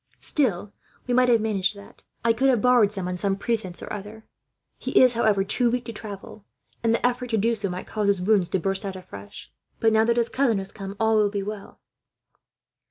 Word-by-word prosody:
Still, 210 Hz, -, -1 dB, 0.3 s
we 250 Hz, -, -1 dB
might 250 Hz, 0 st, +4 dB
have 230 Hz, -2 st, +4 dB
managed 205 Hz, -2 st, 0 dB
that; 200 Hz, 0 st, -14 dB, 0.2 s
I 230 Hz, -, +5 dB
could 265 Hz, +4 st, +2 dB
have 250 Hz, -3 st, +3 dB
borrowed 245 Hz, -3 st, +4 dB
some, 195 Hz, -3 st, -5 dB
on 180 Hz, -, -2 dB
some 195 Hz, +2 st, -1 dB
pretence 200 Hz, -4 st, -3 dB
or -, -, -6 dB
other. 210 Hz, +2 st, -8 dB, 0.5 s
"'He -, -, +2 dB
is, 255 Hz, -1 st, +6 dB
however, 215 Hz, -4 st, +2 dB
too 235 Hz, +5 st, +1 dB
weak 245 Hz, 0 st, -2 dB
to 230 Hz, -, -6 dB
travel, 210 Hz, -1 st, -9 dB, 0.4 s
and 225 Hz, -, +3 dB
the 230 Hz, -, +1 dB
effort 250 Hz, 0 st, 0 dB
to 225 Hz, -, +1 dB
do 230 Hz, +3 st, +2 dB
so 205 Hz, -3 st, -2 dB
might 180 Hz, +1 st, -5 dB
cause 210 Hz, -2 st, -2 dB
his 200 Hz, -2 st, +2 dB
wounds 190 Hz, -1 st, +2 dB
to 190 Hz, -, 0 dB
burst 195 Hz, +3 st, -1 dB
out 195 Hz, -1 st, -4 dB
afresh; 100 Hz, -, -11 dB, 0.3 s
but 225 Hz, -1 st, +3 dB
now 220 Hz, 0 st, +4 dB
that 235 Hz, +1 st, +1 dB
his 235 Hz, -1 st, +1 dB
cousin 255 Hz, -5 st, +1 dB
has 195 Hz, 0 st, -5 dB
come, 195 Hz, -1 st, -7 dB
all 220 Hz, 0 st, +3 dB
will 210 Hz, -1 st, +3 dB
be 200 Hz, -1 st, -3 dB
well.' 205 Hz, 0 st, -8 dB
215 Hz, 225 wpm, -24 LUFS, 195-230 Hz, 0.5 s, is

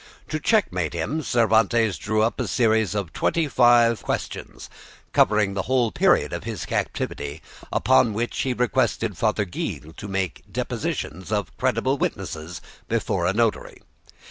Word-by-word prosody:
To 155 Hz, -, -2 dB
checkmate 90 Hz, -, +1 dB
him 140 Hz, -, -2 dB
Cervantes 115 Hz, -, +2 dB
drew 110 Hz, +1 st, +1 dB
up 115 Hz, -, 0 dB
a -, -, -1 dB
series 110 Hz, -4 st, +2 dB
of 100 Hz, -6 st, -3 dB
twenty 165 Hz, -2 st, +1 dB
five 120 Hz, -3 st, +4 dB
questions, -, -, -5 dB, 0.5 s
covering 105 Hz, -1 st, +3 dB
the 100 Hz, -, -1 dB
whole 125 Hz, -4 st, +2 dB
period -, -, +3 dB
of -, -, -4 dB
his -, -, -5 dB
captivity, 70 Hz, +2 st, -3 dB, 0.3 s
upon 130 Hz, -4 st, +3 dB
which 120 Hz, +2 st, -2 dB
he 130 Hz, -, 0 dB
requested 120 Hz, -3 st, 0 dB
Father 105 Hz, +2 st, +1 dB
Gil 80 Hz, -3 st, -5 dB
to 100 Hz, -, -7 dB
take 95 Hz, -3 st, -2 dB
the -, -, -23 dB
depositions 95 Hz, +5 st, -3 dB
of 105 Hz, -4 st, -2 dB
credible -, -, 0 dB
witnesses 80 Hz, +2 st, -4 dB, 0.3 s
before 100 Hz, -6 st, 0 dB
a 90 Hz, -, +1 dB
notary. 115 Hz, 0 st, -1 dB
110 Hz, 145 wpm, -24 LUFS, 95-120 Hz, 0.5 s, five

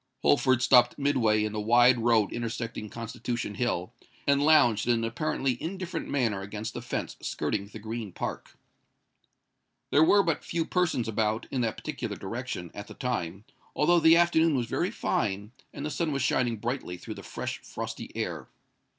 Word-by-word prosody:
Holford 130 Hz, -3 st, +3 dB
stopped 125 Hz, -2 st, +5 dB
midway 120 Hz, -7 st, +2 dB
in 105 Hz, -, -2 dB
the 105 Hz, -, -2 dB
wide 120 Hz, +3 st, +5 dB
road 115 Hz, -3 st, +3 dB
intersecting 115 Hz, -2 st, -4 dB
Constitution 115 Hz, -1 st, -4 dB
Hill, 100 Hz, -5 st, -2 dB, 0.3 s
and 140 Hz, 0 st, +3 dB
lounged 120 Hz, -9 st, +4 dB
in 120 Hz, -, +4 dB
an 115 Hz, -, -1 dB
apparently 125 Hz, +1 st, -1 dB
indifferent 185 Hz, -1 st, -4 dB
manner 115 Hz, -8 st, 0 dB
against 105 Hz, +3 st, -5 dB
the -, -, -5 dB
fence -, -, -4 dB
skirting 100 Hz, -1 st, -2 dB
the 110 Hz, -, -10 dB
Green 110 Hz, -1 st, -5 dB
Park. -, -, -6 dB, 1.3 s
There 145 Hz, -, +6 dB
were 200 Hz, +5 st, +5 dB
but 165 Hz, -4 st, -1 dB
few 165 Hz, -1 st, -2 dB
persons 170 Hz, -10 st, 0 dB
about, 110 Hz, +1 st, 0 dB
in 130 Hz, -, 0 dB
that 115 Hz, -2 st, -1 dB
particular -, -, -4 dB
direction, 85 Hz, -2 st, -5 dB
at 100 Hz, -, -8 dB
the -, -, -11 dB
time,—although 120 Hz, -, -1 dB
the 165 Hz, +1 st, +6 dB
afternoon 165 Hz, -2 st, +4 dB
was 125 Hz, -2 st, 0 dB
very -, -, -1 dB
fine, 100 Hz, +2 st, -2 dB, 0.2 s
and 140 Hz, -, -6 dB
the 150 Hz, -, -3 dB
sun 165 Hz, -1 st, -1 dB
was 140 Hz, -2 st, -1 dB
shining 120 Hz, -3 st, +1 dB
brightly 120 Hz, -5 st, -4 dB
through -, -, -7 dB
the -, -, -10 dB
fresh, -, -, -5 dB
frosty -, -, -7 dB
air. -, -, -3 dB
120 Hz, 165 wpm, -28 LUFS, 110-145 Hz, 1.3 s, There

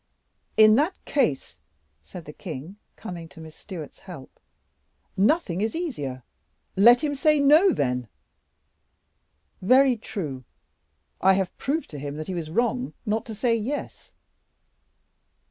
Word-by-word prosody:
"In 215 Hz, 0 st, +8 dB
that 315 Hz, +7 st, +1 dB
case," 240 Hz, -, -1 dB, 0.4 s
said 155 Hz, -, -11 dB
the 150 Hz, -, -10 dB
king, 160 Hz, +11 st, -8 dB, 0.2 s
coming 175 Hz, -6 st, -8 dB
to 165 Hz, -, -15 dB
Miss 160 Hz, -1 st, -11 dB
Stewart's 165 Hz, -8 st, -9 dB
help, 175 Hz, -9 st, -12 dB, 0.8 s
"nothing 200 Hz, -, +1 dB
is 220 Hz, +5 st, -1 dB
easier; 145 Hz, -, -4 dB, 0.5 s
let 240 Hz, +7 st, +6 dB
him 295 Hz, -1 st, 0 dB
say 305 Hz, +1 st, +2 dB
'No,' 305 Hz, +7 st, +6 dB
then." 125 Hz, -, -1 dB, 1.5 s
"Very 255 Hz, +6 st, +5 dB
true; 175 Hz, -, -5 dB, 0.8 s
and 190 Hz, -, +4 dB
I -, -, +7 dB
have 190 Hz, -1 st, -1 dB
proved 310 Hz, +4 st, -2 dB
to 145 Hz, -, -7 dB
him 145 Hz, +1 st, -6 dB
he 190 Hz, -, -5 dB
was 165 Hz, -3 st, -4 dB
wrong 240 Hz, +7 st, -1 dB
not 220 Hz, +2 st, -1 dB
to 220 Hz, -, -6 dB
say 230 Hz, +2 st, +1 dB
'Yes. 245 Hz, +7 st, -5 dB
210 Hz, 130 wpm, -25 LUFS, 160-260 Hz, 1.5 s, In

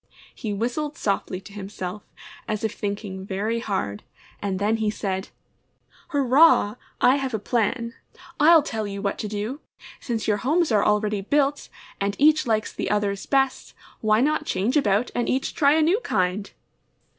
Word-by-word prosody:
He 220 Hz, -, -5 dB
whistled 250 Hz, +9 st, -2 dB
softly 195 Hz, -2 st, -1 dB
to 200 Hz, +1 st, -13 dB
himself, 195 Hz, -1 st, -6 dB, 0.5 s
as 215 Hz, 0 st, -2 dB
if 220 Hz, -, -1 dB
thinking 200 Hz, -2 st, -4 dB
very 205 Hz, +4 st, -2 dB
hard, 190 Hz, -, -3 dB, 0.4 s
and 195 Hz, -2 st, -2 dB
then 210 Hz, +3 st, +1 dB
he 220 Hz, -1 st, 0 dB
said, 195 Hz, -2 st, -3 dB, 0.8 s
^^Hurrah! 280 Hz, -5 st, +4 dB, 0.2 s
I 260 Hz, +3 st, +5 dB
have 265 Hz, -4 st, -2 dB
a -, -, +1 dB
plan! 230 Hz, +2 st, -1 dB, 0.5 s
I'll 315 Hz, +1 st, +7 dB
tell 220 Hz, -7 st, -3 dB
you 200 Hz, 0 st, -5 dB
what 200 Hz, -, -1 dB
to 215 Hz, -, -3 dB
do! 210 Hz, +7 st, -4 dB, 0.4 s
Since 230 Hz, -3 st, -3 dB
your 210 Hz, -1 st, +2 dB
homes 310 Hz, -, +1 dB
are 210 Hz, -2 st, +4 dB
already 210 Hz, -1 st, +1 dB
built, 285 Hz, +6 st, 0 dB, 0.3 s
and 200 Hz, 0 st, -1 dB
each 305 Hz, -1 st, +4 dB
likes 215 Hz, -1 st, 0 dB
the -, -, -3 dB
others' 205 Hz, -1 st, -1 dB
best, 270 Hz, -1 st, 0 dB, 0.2 s
why 215 Hz, +1 st, +3 dB
not 300 Hz, +2 st, +1 dB
change 200 Hz, +9 st, 0 dB
about 225 Hz, -4 st, +2 dB
and 240 Hz, -, -1 dB
each 260 Hz, +1 st, 0 dB
try 285 Hz, -2 st, +4 dB
a 315 Hz, 0 st, +3 dB
new 350 Hz, +7 st, +3 dB
kind?' 195 Hz, -, -1 dB
215 Hz, 165 wpm, -24 LUFS, 200-270 Hz, 0.8 s, I'll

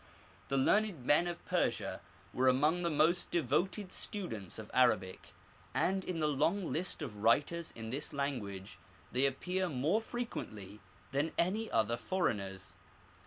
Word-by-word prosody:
The 135 Hz, -, 0 dB
learned 185 Hz, -, +2 dB
men 160 Hz, +6 st, +4 dB
of 175 Hz, 0 st, -5 dB
Persia -, -, 0 dB, 0.3 s
were 130 Hz, +1 st, +2 dB
among 150 Hz, +7 st, +4 dB
the 170 Hz, -, +1 dB
most 165 Hz, +3 st, +3 dB
devoted 175 Hz, -, 0 dB
students 115 Hz, -, -3 dB
of 110 Hz, -1 st, -8 dB
Arabic, 110 Hz, -8 st, +2 dB, 0.4 s
and 190 Hz, +1 st, +1 dB
in 180 Hz, -3 st, -3 dB
the 155 Hz, -, +2 dB
long 155 Hz, +6 st, +1 dB
list 175 Hz, -1 st, -2 dB
of 110 Hz, -7 st, -6 dB
writers 145 Hz, +10 st, +2 dB
in 110 Hz, -1 st, -7 dB
this 140 Hz, +5 st, -1 dB
language 100 Hz, -, -4 dB, 0.3 s
they 130 Hz, +3 st, +4 dB
appear 180 Hz, +7 st, -1 dB
more 155 Hz, -, +1 dB
frequently 110 Hz, -, -5 dB, 0.3 s
than 145 Hz, +4 st, 0 dB
any 210 Hz, +6 st, +1 dB
other 115 Hz, +1 st, +1 dB
foreigners. 100 Hz, -, -2 dB
145 Hz, 140 wpm, -34 LUFS, 115-175 Hz, 0.4 s, men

